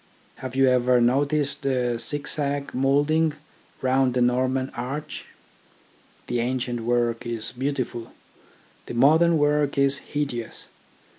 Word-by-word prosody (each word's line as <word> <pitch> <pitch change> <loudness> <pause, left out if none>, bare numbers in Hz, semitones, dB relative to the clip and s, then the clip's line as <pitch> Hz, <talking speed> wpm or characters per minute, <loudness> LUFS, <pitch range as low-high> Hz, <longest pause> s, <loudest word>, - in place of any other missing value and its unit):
Have 130 -1 -7
you 135 0 +4
ever 125 0 +3
noticed 140 +4 +1
the 125 -3 0
zig 145 +4 -2
zag 140 -1 -1
moulding 145 +4 +2 0.5
round 130 -1 +2
a - - +2
Norman 130 +2 +1
arch? 135 +5 -5 1.0
The 120 - -2
ancient 125 0 -2
work 120 0 0
is 115 -2 -4
beautiful, 130 -3 -3 0.8
the - - -6
modern 160 +7 +5
work 145 -1 +1
is 140 0 +2
hideous. 140 -6 -5
130 Hz, 120 wpm, -24 LUFS, 120-145 Hz, 1.0 s, modern